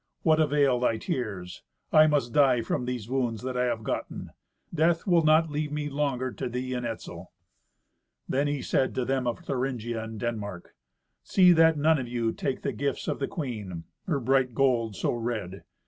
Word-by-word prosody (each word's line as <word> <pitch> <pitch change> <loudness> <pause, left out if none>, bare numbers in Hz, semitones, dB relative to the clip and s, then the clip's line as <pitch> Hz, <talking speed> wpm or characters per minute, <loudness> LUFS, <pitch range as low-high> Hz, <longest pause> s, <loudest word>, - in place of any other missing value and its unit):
What 160 -1 +4
avail 145 -4 +3
thy 120 -2 +1
tears? 105 - -4 0.3
I 155 0 +7
must 140 -6 +1
die 130 -5 +4
from 125 - -2
these 125 -4 -4
wounds 125 -3 -1
that 130 0 -3
I 125 0 +1
have 115 -2 -2
gotten. - - -4 0.4
Death 165 +1 +2
will 175 -3 +4
not 155 +1 +4
leave 150 0 -2
me 150 0 -2
longer 135 -3 -1
to - - -4
thee 125 +1 -3
and 125 -1 -2
Etzel." 115 - -7 1.0
Then 140 +2 +1
he 145 -2 -2
said 130 - 0
to 130 -2 0
them 130 -1 0
of 120 - -2
Thuringia 120 -4 -2
and 110 -1 -7
Denmark, 105 -6 -5 0.5
"See 180 -2 +5
that 160 -2 +5
none 155 +1 +3
of 125 - -4
you 120 -2 -1
take 140 - -3
the - - -1
gifts 140 -1 -2
of - - -2
the 135 - -1
queen—her 115 - -5
bright 130 -1 +2
gold 120 -5 +2
so 85 - 0
red. 115 -5 -4
130 Hz, 180 wpm, -27 LUFS, 115-145 Hz, 1.0 s, I